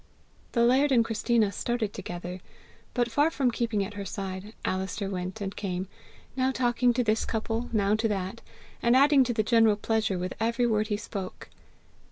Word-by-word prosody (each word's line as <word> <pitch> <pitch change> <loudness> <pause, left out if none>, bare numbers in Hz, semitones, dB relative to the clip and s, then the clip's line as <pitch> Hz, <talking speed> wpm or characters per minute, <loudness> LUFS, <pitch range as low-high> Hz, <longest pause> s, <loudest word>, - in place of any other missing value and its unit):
The 235 - +3
laird 265 +4 +4
and 235 -3 +4
Christina 225 -1 +1
started 225 +1 -2
together, 175 +1 -6 0.6
but, 240 -2 +1
far 290 +7 +3
from 270 -6 +1
keeping 230 -4 0
at 205 - -8
her 205 -1 -5
side, 195 +1 -6
Alister 195 +2 -2
went 185 +2 -4
and 195 0 -4
came, 190 -2 -3 0.5
now 260 0 +2
talking 245 -1 +2
to 250 - +2
this 220 -1 +1
couple, 225 +2 -2
now 205 -2 +2
to 220 +1 +2
that, 195 +1 -3 0.4
and 235 +1 +4
adding 280 0 +6
to 245 - -1
the 220 -2 +1
general 225 -1 +4
pleasure 215 -2 0
with 180 +1 -3
every 230 +2 +1
word 215 -2 +1
he 210 -2 -1
spoke. 195 -3 -7
220 Hz, 180 wpm, -28 LUFS, 195-240 Hz, 0.6 s, adding